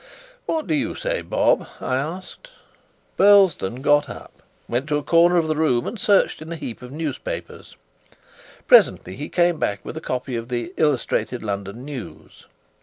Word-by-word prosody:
"What 315 -1 -1
do - - -1
you 290 -2 -1
say, - - -2
Bob?" - - +1
I 130 - -2
asked. 175 - -5 0.7
Burlesdon 185 - +4
got 145 -1 +3
up, - - -10 0.3
went 125 +4 -2
to 150 - +2
a 150 - -4
corner 170 +2 +4
of 165 -2 +2
the 155 - 0
room, 140 -6 +1
and 225 - -5
searched 200 -5 +2
in 160 +1 -8
a - - -3
heap 125 -7 -7
of 125 0 -10
newspapers. 150 -2 -6 0.9
Presently 95 - +4
he 145 - -6
came 175 -2 +2
back 100 -1 -2
with - - -7
a 160 - -6
copy 125 -3 -3
of 115 +1 -5
the 125 +9 -3
Illustrated 130 -4 0
London 100 +3 -5
News. 140 -5 -10
150 Hz, 170 wpm, -22 LUFS, 125-175 Hz, 0.9 s, Burlesdon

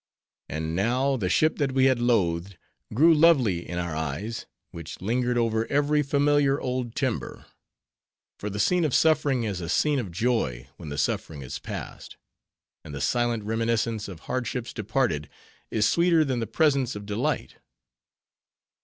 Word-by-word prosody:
And 80 +1 -3
now, 125 +8 +1
the 100 -8 -1
ship 155 - +2
that 140 -3 0
we 130 0 +4
had 130 -2 +3
loathed, 95 -6 +1 0.3
grew 160 +9 +5
lovely 135 - +3
in 90 - -4
our 85 -2 -3
eyes, 80 +9 -4 0.2
which 85 -2 -8
lingered 120 +4 0
over 115 -1 +1
every 145 +1 +2
familiar 145 0 +2
old 125 -2 -3
timber; 130 -5 -3 0.9
for 105 - -4
the 105 +1 -5
scene 180 +9 +3
of 150 -5 +1
suffering 145 -6 +3
is 100 -5 -3
a 85 - -5
scene 150 -2 +2
of 105 -8 -4
joy 85 - -1
when 80 -4 -8
the 70 - -5
suffering 70 +1 -2
is 65 - -6
past; - - -8 0.7
and 75 - -8
the - - -5
silent 120 - 0
reminiscence 115 0 -1
of 90 -5 -9
hardships 125 -1 -3
departed, 105 - -1 0.4
is 110 -1 +2
sweeter 170 -2 +3
than 130 -3 -1
the 115 - -3
presence 135 0 +1
of 105 0 -7
delight. 105 0 -2
115 Hz, 155 wpm, -26 LUFS, 95-135 Hz, 0.9 s, grew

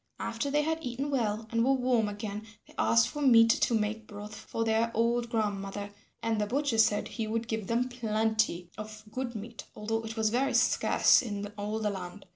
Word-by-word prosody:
After 230 +4 -2
they 295 +1 +2
had 320 +1 -1
eaten 260 +4 -3
well 220 -4 -1
and 230 0 +2
were 270 +2 +4
warm 245 -4 +1
again, 210 +1 -6 0.2
they - - -17
asked 115 +1 +4
for 295 - -6
meat 230 -4 +7
to 235 - +2
make 215 0 -2
broth 210 0 -8
for 220 +2 -4
their 225 +1 +2
old 235 +1 +1
grandmother, 205 -2 -2 0.3
and 225 -2 0
the 210 - 0
butcher 260 -1 0
said 215 -1 +3
he 225 -2 -4
would 225 +1 -2
give 220 -3 -3
them 240 +2 +1
plenty 220 -6 0
of 215 0 -8
good 245 0 -4
meat 220 +2 -7
although 225 +1 -2
it 225 +1 -7
was 220 -1 +2
very 260 +4 +1
scarce - - +4
in 205 -4 -4
all 210 +1 -3
the 215 -2 -1
land. 190 +1 -7
220 Hz, 200 wpm, -30 LUFS, 210-235 Hz, 0.3 s, meat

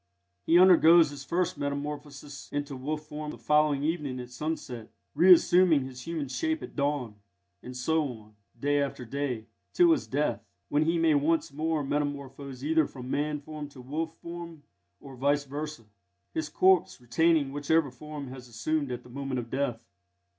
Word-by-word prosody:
He 165 - +6
undergoes 170 -3 +7
his 140 -1 -8
first 170 +1 -1
metamorphosis 145 0 -5
into 145 -1 -3
wolf 150 +4 -4
form 150 0 -6
the 135 - -7
following 150 +3 +2
evening 150 -5 -2
at 125 0 -8
sunset, 125 -5 -5 0.2
reassuming 175 -2 +6
his 130 -1 -9
human 165 -4 -3
shape 320 - -2
at - - -9
dawn; 140 -7 -1 0.4
and 125 0 -8
so 160 +5 +1
on, 110 -4 -11 0.2
day 145 +2 +2
after 135 -3 -3
day, 125 -3 -3 0.3
till 350 -1 +5
his 325 - +1
death, 145 +3 -1 0.3
when 150 +2 +2
he 165 +1 +2
may 165 -1 +4
once 150 0 +1
more 155 0 -1
metamorphose 140 -2 -4
either 160 -1 +3
from 130 -1 -8
man 150 0 -1
form 150 0 -7
to 140 - -15
wolf 160 +6 -4
form, 170 -2 -8 0.4
or 135 -1 -11
vice 140 +3 +1
versa, 145 -1 -6 0.5
his 155 -1 -2
corpse 185 -3 +3
retaining 140 +4 +2
whichever 145 0 +1
form 145 +1 -8
has 130 -1 -9
been - - -16
assumed 145 +4 -1
at 125 0 -5
the - - -15
moment 135 +1 -4
of 120 -1 -5
death. 125 -4 -2
145 Hz, 170 wpm, -28 LUFS, 135-160 Hz, 0.5 s, undergoes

